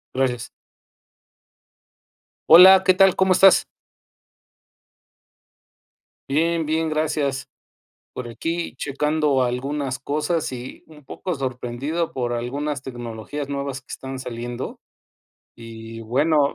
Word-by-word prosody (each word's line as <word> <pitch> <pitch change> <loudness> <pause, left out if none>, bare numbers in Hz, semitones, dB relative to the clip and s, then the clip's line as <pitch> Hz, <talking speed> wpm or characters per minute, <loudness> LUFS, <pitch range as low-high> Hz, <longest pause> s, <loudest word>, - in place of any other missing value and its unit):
Gracias. 125 -3 -1 2.0
Hola. 185 +3 +9
¿Qué 185 - +6
tal? 190 0 +5
¿Cómo 190 0 +3
estás? 190 +1 +6 2.7
Bien, 165 +3 +1
bien, 160 +1 0
gracias 145 -4 -1 0.6
por 125 - -7
aquí 165 +9 -4
checando 150 0 0
algunas 130 +2 -2
cosas 150 +3 -2
y 125 0 -8
un 150 -3 -17
poco 180 +6 -5
sorprendido 135 +4 -3
por 120 -2 -2
algunas 140 +4 -3
tecnologías 120 +2 -6
nuevas 140 -1 -4
que 130 - -33
están 135 0 -7
saliendo 120 0 -6 0.8
y 115 0 -10
bueno, 140 +5 +2
140 Hz, 100 wpm, -22 LUFS, 125-155 Hz, 2.7 s, Hola